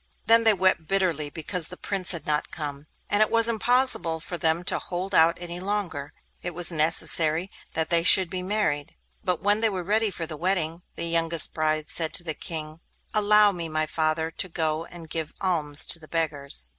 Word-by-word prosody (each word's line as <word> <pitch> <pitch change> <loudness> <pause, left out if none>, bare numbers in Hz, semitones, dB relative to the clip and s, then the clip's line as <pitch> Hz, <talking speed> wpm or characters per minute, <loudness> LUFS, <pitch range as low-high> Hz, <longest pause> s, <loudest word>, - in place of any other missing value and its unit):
Then 230 0 +4
they 220 - +5
wept 185 -4 0
bitterly 170 -6 -1
because 160 +2 +1
the 180 - -10
Prince 195 -3 -1
had 170 -5 0
not 150 0 -1
come, 145 -2 -6 0.2
and 205 - 0
it 215 - +3
was 230 0 +6
impossible 230 -7 +3
for 175 - -7
them 165 0 0
to - - -1
hold 185 +2 -5
out 165 -1 +4
any 175 0 -5
longer; 180 -8 -4 0.3
it 175 -2 -6
was 175 0 +1
necessary 160 +2 +1 0.2
that 160 0 -2
they 170 -1 +3
should 180 +2 +7
be 185 +1 -5
married. 180 -7 -2 0.3
But 180 -3 -2
when 205 +2 +1
they 225 - +3
were 185 -3 -5
ready 215 +4 0
for 175 -3 -6
the 160 -1 -7
wedding, 170 -1 -1
the 170 - -4
youngest 165 -1 +2
bride 155 -1 -1
said 160 -2 0
to - - -2
the 160 -2 -3
King: 155 0 -6 0.3
'Allow 210 0 +4
me, 170 -3 -5
my 155 0 -1
father, 160 +1 -1
to 185 - -2
go 160 -1 -2
and 170 -2 -12
give 160 -1 -6
alms 155 -6 +1
to 170 - +1
the 155 - -15
beggars. 140 - 0
170 Hz, 200 wpm, -24 LUFS, 155-190 Hz, 0.3 s, should